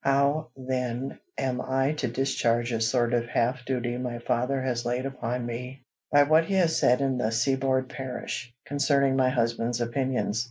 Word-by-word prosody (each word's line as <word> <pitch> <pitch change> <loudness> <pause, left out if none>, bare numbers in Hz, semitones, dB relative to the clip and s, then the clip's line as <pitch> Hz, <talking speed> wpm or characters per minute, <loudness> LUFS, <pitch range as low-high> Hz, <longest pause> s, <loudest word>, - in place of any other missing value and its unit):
How, 140 +3 +2
then, 130 0 -3 0.2
am 125 -1 -1
I 135 +2 +1
to - - -1
discharge 120 -1 0
a 115 -1 -1
sort 120 +1 +2
of 120 -1 +1
half 120 +1 0
duty 120 -2 -2
my 125 -1 -3
father 125 +3 0
has 120 -2 -1
laid 125 +2 -1
upon 125 -2 -3
me 125 +3 -6 0.3
by 145 0 +7
what 155 +3 +4
he 195 - -1
has 170 -4 +3
said 125 +2 +4
in 135 -2 0
"The 110 - +1
Seaboard 130 +2 +1
Parish," 125 -2 -5
concerning 140 -1 +2
my 130 -1 +3
husband's 120 -1 0
opinions? 120 -2 -1
130 Hz, 170 wpm, -27 LUFS, 120-135 Hz, 0.3 s, by